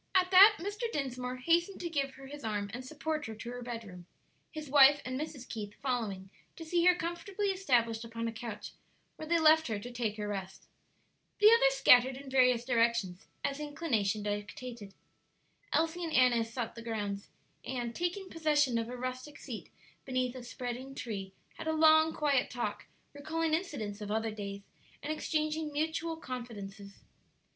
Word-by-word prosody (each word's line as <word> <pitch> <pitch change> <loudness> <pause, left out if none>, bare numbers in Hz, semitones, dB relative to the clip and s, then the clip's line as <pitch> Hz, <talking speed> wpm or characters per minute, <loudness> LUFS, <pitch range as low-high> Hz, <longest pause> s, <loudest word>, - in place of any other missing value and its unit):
At 365 0 +4
that 395 +3 +9
Mr. 415 +6 -3
Dinsmore 255 - -3
hastened 340 +8 +1
to 350 - -2
give 275 -5 -2
her 270 - -12
his 290 +1 -9
arm 205 -2 -2
and 250 +2 -5
support 305 +1 -3
her 220 - -6
to 235 +2 -7
her 245 0 -6
bedroom, 220 -7 -7 0.4
his 310 -1 -7
wife 285 +1 +7
and 255 0 -3
Mrs. 285 -5 -6
Keith 210 -2 -6
following 210 -8 -2 0.2
to 330 - -8
see 340 +1 +1
her 360 0 +7
comfortably 355 +4 -3
established 240 -12 +1
upon 230 0 -4
a - - -2
couch, 225 -1 -7 0.4
where 310 - -8
they 340 +1 +3
left 315 0 +5
her 220 -3 -1
to 240 +5 -7
take 230 -3 -2
her 210 -1 -3
rest. 195 -2 -5 0.7
The 420 +1 +7
others - - +5
scattered 255 - +6
in 275 -1 -10
various 250 -2 +4
directions, 230 -7 +1 0.2
as 275 +1 -1
inclination 275 -10 -1
dictated. 205 +1 -5 0.8
Elsie 330 +2 +1
and 325 -2 -3
Annis 240 -3 +4
sought 235 -1 -3
the 230 - -9
grounds, 205 -3 -4 0.3
and, 240 -2 -3
taking 355 - -2
possession 295 -8 +2
of 230 0 -3
a 250 - -6
rustic 255 +3 -5
seat 240 -5 -8 0.4
beneath 255 -2 -1
a 255 - -6
spreading 250 +2 -6
tree, 200 -6 -5 0.3
had - - -5
a 315 - +1
long, 315 0 +6
quiet 285 -5 +1
talk, 210 -4 -4 0.3
recalling 310 +2 -2
incidents 225 - -2
of 205 - -5
other 220 +1 0
days, 200 -1 -6 0.4
and 300 +2 -1
exchanging 310 0 -1
mutual 320 +2 -2
confidences. 210 -7 -8
255 Hz, 170 wpm, -32 LUFS, 225-315 Hz, 0.8 s, that